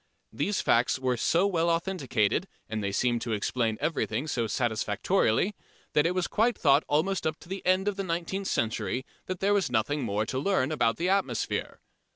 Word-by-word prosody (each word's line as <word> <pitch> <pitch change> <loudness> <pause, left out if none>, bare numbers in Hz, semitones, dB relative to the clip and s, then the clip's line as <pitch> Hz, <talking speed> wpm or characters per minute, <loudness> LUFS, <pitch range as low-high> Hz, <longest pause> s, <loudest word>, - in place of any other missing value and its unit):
These 205 -1 0
facts 120 +2 +3
were 130 -1 0
so 170 - +2
well 170 -4 +1
authenticated, 165 - 0 0.2
and 110 -1 -3
they 100 - -1
seemed 120 +3 +1
to 115 - -2
explain 110 +1 0
everything 145 -5 -1
so 120 -6 -1
satisfactorily, 110 - +1 0.4
that 150 +2 +4
it 180 - -1
was 185 -1 +1
quite 230 +1 +1
thought 145 0 +4
almost 170 +5 +1
up 155 0 -2
to - - -14
the 195 +1 -5
end 185 +2 +3
of 205 -1 0
the 195 - -2
nineteenth 180 +2 -3
century 120 +3 -1 0.2
that 185 -1 -4
there 200 +1 +3
was 195 -8 +1
nothing 125 +5 0
more 105 -3 -1
to 130 +3 -2
learn 160 -4 +1
about 115 -7 +1
the 175 - -1
atmosphere. 195 0 -1
150 Hz, 190 wpm, -28 LUFS, 115-185 Hz, 0.4 s, that